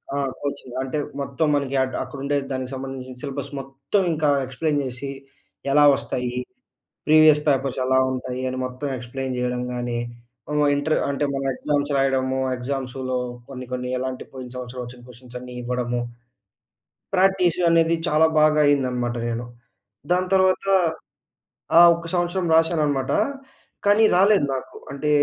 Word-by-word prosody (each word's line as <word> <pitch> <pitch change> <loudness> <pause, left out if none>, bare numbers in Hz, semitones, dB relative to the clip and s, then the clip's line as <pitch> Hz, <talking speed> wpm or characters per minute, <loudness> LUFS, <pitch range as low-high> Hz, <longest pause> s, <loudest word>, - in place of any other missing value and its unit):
ఆ! - - -1 0.2
కోచింగ్ 140 -3 -5
అంటే 135 +3 -3 0.2
మొత్తం 140 +3 -1
మనకి 140 -1 -1
అటు 130 - -4
అక్కడుండే 140 +1 -2
దానికి 130 0 -3
సంబంధించిన 130 -1 -7
సిలబస్ 140 -1 -5
మొత్తం 135 +8 -2
ఇంకా 155 -1 +1 0.2
ఎక్స్‌ప్లే‌యిన్ 145 +3 -1
చేసి 130 +2 -6 0.6
ఎలా 145 +1 +6
వస్తాయి, 125 -1 -3 0.7
ప్రీవియస్ 155 -1 +6
పేపర్స్ 135 -2 +1
ఎలా 130 0 +3
ఉంటాయి, 130 0 -4
అని 130 - -4
మొత్తం 130 +3 -5
ఎక్స్‌ప్లే‌యిన్ 130 +1 -5
చేయడం 125 0 -1
గాని, 120 -1 -2 0.5
హ్మ్, 150 0 +1
ఇంటర్ 145 +2 +1
అంటే 140 +1 -1
మనం 135 0 -2
ఎగ్జామ్స్ 145 +1 -1
రాయడము, 130 -1 +1 0.2
ఎగ్జామ్స్‌ల్లో 130 0 -3 0.3
కొన్ని, 130 -2 -7
కొన్ని 125 0 -3
ఎలాంటి 130 0 -4
పోయిన 130 -1 -8
సంవత్సరం 125 0 -6
వచ్చిన 120 0 -11
క్వెషన్స్ 125 0 -11
అన్నీ 125 0 -10
ఇవ్వడము, 120 0 -1 1.2
ప్రాక్టీస్ 185 -2 +3
అనేది 165 0 +4
చాలా 155 +2 +4
బాగా 155 0 +4
అయిందన్నమాట 125 -4 +1
నేను. 120 +1 -3 0.7
దాని 185 +1 +1
తర్వాత 190 0 +2 1.1
ఆ! - - +11
ఒక్క 170 0 -6
సంవత్సరం 175 +1 0
రాసానన్నమాట. 150 -5 +2 0.7
కానీ 205 +2 +5
రాలేదు. 195 -3 +5
నాకు 130 - -7 0.2
అంటే 140 +2 -2
135 Hz, 135 wpm, -23 LUFS, 125-150 Hz, 1.2 s, ఆ